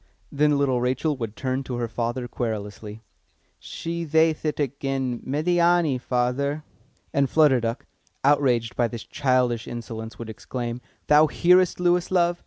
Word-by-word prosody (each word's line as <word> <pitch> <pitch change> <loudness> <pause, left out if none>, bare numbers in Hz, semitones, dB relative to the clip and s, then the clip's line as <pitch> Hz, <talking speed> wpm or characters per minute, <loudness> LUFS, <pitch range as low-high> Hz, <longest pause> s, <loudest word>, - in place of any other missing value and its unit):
Then 145 0 +2
little 130 -3 +1
Rachel 130 +5 0
would 115 -4 -5
turn 130 0 -2
to 125 - -4
her 120 -1 -2
father 120 +2 -3
querulously. 110 -2 -5 0.6
"She 170 0 -5
thayth 160 0 +2
it 150 -1 -1
again, 135 -3 -2
Médiâni, 170 -1 +1
father!" 135 +5 -1 0.5
And 140 -1 +2
Flutter 150 -5 +4
Duck, 115 +2 -3 0.4
outraged 130 -5 +2
by 120 - +2
this 115 -1 -7
childish 125 -4 0
insolence, 110 -2 -7
would 115 - -7
exclaim, 120 +2 -5 0.2
"Thou 150 +1 +6
hearest, 180 +4 +3
Lewis, 175 0 +2
love?" 175 -1 +2
130 Hz, 140 wpm, -24 LUFS, 120-150 Hz, 0.6 s, Thou